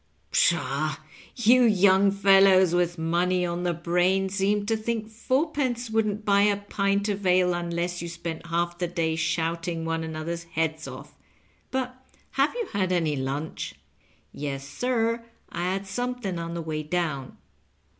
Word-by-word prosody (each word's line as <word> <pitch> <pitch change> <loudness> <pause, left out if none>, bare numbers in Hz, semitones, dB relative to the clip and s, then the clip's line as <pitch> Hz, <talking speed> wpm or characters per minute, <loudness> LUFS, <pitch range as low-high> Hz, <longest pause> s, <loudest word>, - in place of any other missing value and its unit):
Psliaw, - - +1 0.4
yon 240 0 +5
young 195 0 +5
fellows 195 -2 +5
with 175 0 +1
money 175 +3 +1
on 175 0 -2
the 175 -1 0
brain 180 +3 +1
seem 200 +1 +1
to 225 +2 +1
think 220 0 -2
f 220 +1 -19
onrpence 260 -4 0
wouldn't 215 -1 0
buy 200 -1 +4
a 205 0 +3
pint 200 0 0
of 205 -1 -2
ale 180 -1 +3
un 175 0 -3
less 175 +1 -2
you 170 - -5
spent 170 -1 -6
half 170 +1 -1
the 175 - 0
day 165 -2 -1
shouting 165 0 -1
one 165 0 -1
another's 160 +1 -4
heads 160 -1 -2
off. - - -9 0.6
But 255 0 -3 0.3
have 275 +2 +2
you 475 -2 -2
had 190 -2 0
any 165 -4 +1
lunch 140 +4 -4
2 - - -27
" - - -36
" - - -38
Yes, 135 -2 -4
sir, 230 - 0 0.3
I 175 - -3
had 195 +1 -3
something 240 -3 -3
on 170 0 -5
the 170 - -3
way 155 -1 -3
down." 150 -4 -3
180 Hz, 165 wpm, -26 LUFS, 170-210 Hz, 0.6 s, yon